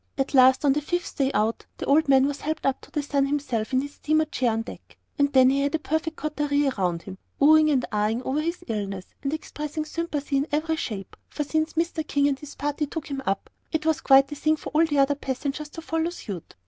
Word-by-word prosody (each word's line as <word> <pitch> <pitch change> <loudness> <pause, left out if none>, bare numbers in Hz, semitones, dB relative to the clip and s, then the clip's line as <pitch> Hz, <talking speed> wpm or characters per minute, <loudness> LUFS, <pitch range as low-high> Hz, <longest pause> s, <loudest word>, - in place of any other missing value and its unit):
At 270 +1 -1
last 260 +1 +6
on 275 - +5
the 300 - -1
fifth 350 +4 -3
day 270 -2 +2
out, 220 0 0
the - - -4
old 290 +1 +3
man 265 -1 +6
was 285 0 -3
helped 310 +1 -3
up 270 -1 +1
to 300 - -4
sun 280 -1 +1
himself 255 -6 -2
in 260 0 +2
his 285 +1 -7
steamer 310 +1 +1
chair 260 -5 0
on 225 0 -1
deck. - - -12 0.2
And 285 0 +3
then 260 -1 +6
he 275 +1 +1
had 285 +3 0
a - - +3
perfect 315 +1 -2
coterie 295 -2 0
around 180 -8 -1
him, 190 -1 -9 0.2
oh 300 +2 +7
ing 310 0 +5
and 265 -4 +2
ah 210 0 +1
ing 230 +3 -2
over 280 +4 0
his 335 +3 -3
illness, 200 -4 -3 0.2
and 275 - -2
expressing 305 0 -4
sympathy 305 -3 -2
in 280 +2 0
every 315 +2 0
shape, 205 -10 -5
for 300 - -3
since 315 +2 -1
Mr. 325 -1 -1
King 285 0 +2
and 275 -1 -2
his 295 -1 -10
party 290 +1 -2
took 300 0 -6
him 275 -1 -3
up, 195 0 -1 0.2
it 315 -1 -1
was 320 -2 +1
quite 270 0 +6
the 295 - -5
thing 310 +2 +2
for - - -8
all 320 +2 +4
the 295 -2 -1
other 275 +1 +4
passengers 280 +2 -4
to 325 +2 -9
follow 325 +1 -1
suit. 200 - -8
285 Hz, 245 wpm, -25 LUFS, 265-310 Hz, 0.2 s, oh